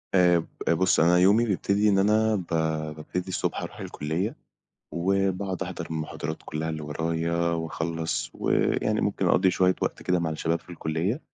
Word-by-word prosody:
آآ 90 -2 +5
ب 80 - -6
بُص، 90 +3 +3
أنا 85 +2 +5
يومي 100 +6 +5
بيبتدي 100 0 +1
إن 100 -1 +3
أنا 110 +2 +3
ب 95 -4 -3 0.5
بابتدي 90 +4 -5
الصبح 95 - -2
أروح - - -7
الكُلّية، 80 +8 -3 0.6
وباقعد 95 +1 0
أحضر - - -5
المحاضرات 80 0 -4
كلّها 80 +1 -3
اللي 80 -1 -4
ورايا، 80 +2 -2 0.2
وأخلّص 80 0 -2
ويعني - - +1
ممكن - - 0
أقضي 95 0 +4
شوية 90 0 +3
وقت - - -2
كده 90 -1 +1
مع 85 -1 -1
الشباب 80 +1 -1
في - - -23
الكُلّية، 85 - -2
90 Hz, 160 wpm, -26 LUFS, 80-95 Hz, 0.6 s, آآ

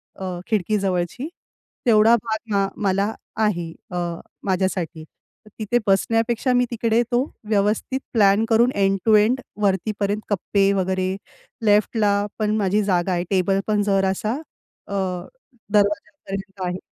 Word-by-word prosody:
अ, 185 -2 -5
खिडकीजवळची. 200 - -1 0.6
तेवढा 225 0 +6
भाग 220 -2 -3
अ, 195 0 +2
मला 200 +2 +1 0.3
आहे 175 -5 -1 0.2
अ, 180 - -3 0.5
माझ्यासाठी. 185 -4 -1 0.4
तर - - -15
तिथे 220 +3 +1
बसण्यापेक्षा 225 +5 +2
मी 245 0 +3
तिकडे 230 0 +2
तो 245 +1 +3 0.3
व्यवस्थित 210 +5 +1
प्लॅन 205 -1 +4
करून 235 +2 +4
एंड 195 -1 +2
टू 220 - +6
एंड 220 +5 +4 0.2
वरती 195 +1 +1
पर्यंत 205 +1 0
कप्पे 200 0 +2
वगैरे. 185 0 0 0.5
लेफ्टला 210 0 +3 0.2
पण 215 0 +1
माझी 205 0 +1
जागा 185 -2 +1
आहे 175 0 0
टेबल 195 0 +2
पण 210 -1 +2
जरासा 195 +1 +1 0.5
अ, 200 - -4 0.8
दरवाज्यापर्यंत 200 -1 -1
आहे. 180 0 -2
205 Hz, 130 wpm, -22 LUFS, 190-220 Hz, 0.8 s, तेवढा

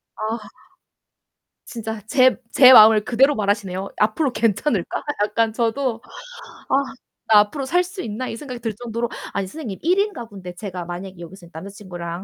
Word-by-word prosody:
아. 220 +1 -3 1.3
진짜 225 -2 -6
제 255 0 +4 0.2
제 260 -1 +8
마음을 215 -3 +8
그대로 270 +4 +3
말하시네요. 200 -2 -2
'앞으로 245 +6 +1
괜찮을까?' 225 - -1 0.2
약간 225 +2 +1
저도 230 +1 -1 0.7
'아 - - +3 0.6
나 210 - +8
앞으로 265 +7 -3
살 355 +7 +2
수 365 +2 -8
있나?' 230 +3 -5
이 225 - -6
생각이 250 -3 -8
들 225 -1 -3
정도로 235 +2 -4 0.2
아니 200 - -1
선생님 215 -3 -7
1 360 +5 +2
인 415 0 0
가구인데 200 -7 -9
제가 180 -3 -6
만약에 180 +1 -8
여기서 175 +1 -11
남자친구랑 175 -1 -8
220 Hz, 330 characters per minute, -21 LUFS, 195-250 Hz, 1.3 s, 제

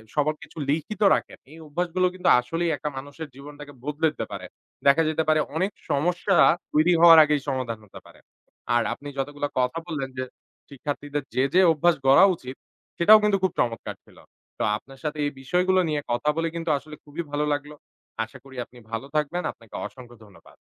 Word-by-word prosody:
সবার 150 +1 +1
কিছু - - -15
লিখিত 165 +8 -2
রাখেন। - - -5
এই 160 - -12
অভ্যাসগুলো 180 +4 0
কিন্তু 180 -1 0
আসলেই 165 +7 -1
একটা 150 - -3
মানুষের 145 +3 -7
জীবনটাকে 145 +1 -11
বদলে 150 +3 0
দিতে 115 - -4
পারে। 95 -2 -6 0.4
দেখা 140 +4 +6
যেতে 160 0 0
পারে 155 0 +4 0.2
অনেক 190 +5 0 0.2
সমস্যা 175 +6 +1 0.4
তৈরি 160 +4 +4
হওয়ার 165 -1 +10
আগেই 150 -2 +1
সমাধান 130 -5 -2
হতে 95 - -12
পারে। - - -17 0.6
আর 120 - +3
আপনি 145 - -11
যতগুলো 145 +1 -2
কথা 125 +6 0
বললেন 140 -5 -3
যে 130 - -1 0.5
শিক্ষার্থীদের 145 +1 -4
যে, 130 - +3
যে 185 - +6
অভ্যাস 170 +2 +3
গড়া 140 +8 +8
উচিত, 130 -3 -9 0.4
সেটাও 215 +6 +8
কিন্তু 205 -2 +3
খুব 190 - +2
চমৎকার 115 -1 -1
ছিল। - - -21 0.4
তো - - 0
আপনার 135 +4 -16
সাথে 150 0 -3
এই 145 - -1
বিষয়গুলো 180 +6 +2
নিয়ে 150 -1 -1
কথা 120 +5 0
বলে 165 0 0
কিন্তু 165 0 -3
আসলে 150 +3 -10
খুবই 150 +3 -6
ভালো 150 +1 0
লাগলো। 145 +1 -5 0.5
আশা 115 +4 -10
করি 135 -1 -14
আপনি 125 - -19
ভালো 115 +4 -3
থাকবেন, 155 +4 0
আপনাকে 115 -2 -16
অসংখ্য 120 -2 -11
ধন্যবাদ। 100 -2 -18
150 Hz, 185 wpm, -25 LUFS, 135-165 Hz, 0.6 s, হওয়ার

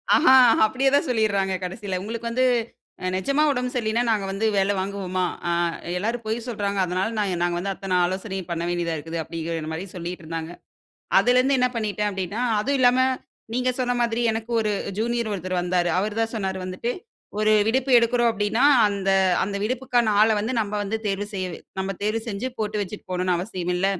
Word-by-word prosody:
ஆஹா, 260 - +6 0.3
அப்படியே 260 +5 +1
தான் 285 - +2
சொல்லிடுறாங்க 200 -5 +1
கடைசியில 190 0 -4
"உங்களுக்கு 230 +3 -4
வந்து 255 +2 +2 0.7
நிஜமா 275 +10 +1
உடம்பு 250 -2 -2
சரியில்லன்னா, 230 0 0
நாங்க 210 -3 +1
வந்து 195 +3 -1
வேலை 195 +1 +2
வாங்குவோமா? 190 -1 -2 0.3
அ - - +2 0.5
எல்லாரும் 230 +4 -2
பொய் 220 +1 -1
சொல்றாங்க. 200 -3 -2
அதனால, 185 +3 -1 0.4
நாங்க 175 0 0
வந்து 195 +2 -2
அத்தனை 190 -1 -2
ஆலோசனையும் 190 0 -4
பண்ண 170 0 -2
வேண்டியதா 170 -2 -1
இருக்குது", 165 +3 -6
அப்படிங்கிற 165 -1 -4
மாரி 175 +4 -4
சொல்லிட்டு 175 -1 -6
இருந்தாங்க. 165 +1 -5 0.7
அதில 245 +1 +4
இருந்து 270 +2 +2
என்ன 250 0 +3
பண்ணிட்டேன் 210 -2 -1
அப்படின்னா, 190 +3 -4 0.2
அதுவும் 275 +6 0
இல்லாம, 250 0 +5 0.6
நீங்க 255 +1 +1
சொன்ன 250 -1 +1
மாதிரி 235 0 0
எனக்கு 225 +1 -5
ஒரு 215 - 0 0.3
ஜூனியர் 235 0 -1
ஒருத்தர் 185 -2 -2
வந்தாரு. 180 -1 +1
அவரு 210 +2 -1
தான் 225 0 -1
சொன்னாரு 190 -3 -2
வந்துட்டு, 185 +6 -3 0.5
"ஒரு 215 0 +3 0.2
விடுப்பு 260 +3 +1
எடுக்கிறோம் 235 0 +2
அப்படின்னா, 220 +4 +1 0.2
அந்த 195 -1 -1 0.3
அந்த 200 +1 -3
விடுப்புக்கான 240 -2 +1
ஆள 220 - +5
வந்து 225 +5 -2
நாம 210 0 -2
வந்து 220 +3 -2
தேர்வு 200 0 -1
செஞ்சு 185 -3 -4 0.2
நாம 195 +1 -2
தேர்வு 215 +2 0
செஞ்சு 220 +4 -3
போட்டு 210 -1 -1
வச்சுட்டு 200 +2 -8
போணும்ன்னு 180 -1 +1
அவசியம் 180 -2 -3
இல்ல. 190 +2 +1
205 Hz, 175 wpm, -24 LUFS, 185-235 Hz, 0.7 s, ஆஹா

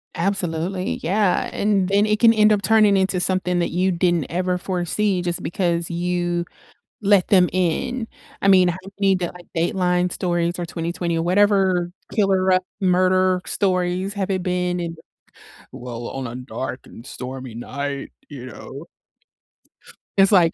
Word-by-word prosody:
Absolutely. 185 0 -2
Yeah. 190 +2 +1
And 200 -3 +1
then 200 +1 +3
it 210 0 +1
can 230 -1 +6
end 215 -1 +4
up 205 -1 +2
turning 210 -1 +4
into 190 -1 +1
something 180 -1 0
that 170 - 0
you 185 +2 +1
didn't 175 -3 +1
ever 180 +1 0
foresee 185 +2 -1
just 175 -1 -3
because 170 -2 -1
you 175 0 -1 0.6
let 200 -2 +4
them 185 -3 +4
in? 205 +7 -1 0.3
I - - +1
mean, 185 -2 +6
how 175 - -3 0.2
many, 195 -1 +3
d 180 -1 -1
like, 175 +1 -12
Dateline 180 +1 +1
stories 175 -1 -1
or 175 - -3
20/20 170 0 -3
or - - 0
whatever, 185 -1 +2 0.2
killer 190 -3 +3 0.2
murder 185 -1 +2
stories 185 0 0
have 195 -1 -2
it 185 - -1
been 180 0 -1
in, 170 -1 -4 0.8
"Well, 120 -1 -7
on 135 -1 -5
a 115 - -7
dark 125 0 -5
and 115 - -13
stormy 130 -1 -7
night," 140 +4 -5 0.2
you 135 -4 -9
know? 135 +6 -10 1.3
It's 195 +1 +5
like, 175 -4 +5
180 Hz, 150 wpm, -22 LUFS, 170-195 Hz, 1.3 s, can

